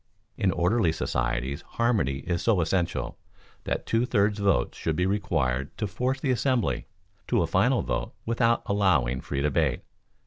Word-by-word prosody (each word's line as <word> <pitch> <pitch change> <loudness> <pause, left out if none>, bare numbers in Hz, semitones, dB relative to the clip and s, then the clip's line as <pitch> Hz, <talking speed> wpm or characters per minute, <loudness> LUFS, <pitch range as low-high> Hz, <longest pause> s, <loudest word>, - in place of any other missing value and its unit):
In 95 - +1
ordinary 90 +2 +2
societies 60 -2 -2
harmony 105 - 0
is 85 -1 -1
so 110 -5 +2
essential, 85 -6 -1 0.5
that - - -1
a - - -28
two 115 +2 +1
thirds 105 -1 +2
vote 100 -1 +2
should 80 - -2
be 90 - +1
required 80 -10 -1
to 105 - -1
force 125 +7 -1
the 135 -1 0
assembly 130 -1 0 0.4
to - - +2
a - - +1
final - - +2
vote - - -3
without 115 0 +2
allowing 75 -12 +2
free 70 -1 -3
debate. 75 -2 +1
95 Hz, 160 wpm, -27 LUFS, 70-115 Hz, 0.5 s, ordinary